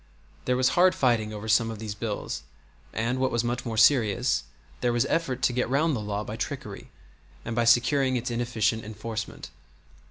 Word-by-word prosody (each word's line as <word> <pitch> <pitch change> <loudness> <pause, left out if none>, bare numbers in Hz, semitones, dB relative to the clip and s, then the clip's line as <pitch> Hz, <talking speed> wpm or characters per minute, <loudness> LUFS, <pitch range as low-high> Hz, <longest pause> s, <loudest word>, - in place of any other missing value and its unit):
There 125 0 +1
was 130 0 +3
hard 180 +1 +4
fighting 115 -5 +1
over 105 +1 -7
some 115 +1 +3
of 110 - -5
these 110 -1 -5
bills, 105 -5 -4 0.5
and, 120 +3 -1
what 130 0 +2
was 120 0 0
much 120 +1 -2
more 110 -1 -3
serious, 115 - +3 0.3
there 120 - +1
was 120 +2 +1
effort 135 -6 -1
to 125 - +3
get 125 -1 0
round 150 +3 +2
the - - -2
law 105 0 -3
by 110 +1 -6
trickery - - -6 0.6
and 120 - -3
by 120 0 +2
securing 130 +3 +4
its 125 0 -2
inefficient 115 -2 0
enforcement. 110 +1 -6
120 Hz, 185 wpm, -26 LUFS, 110-125 Hz, 0.6 s, hard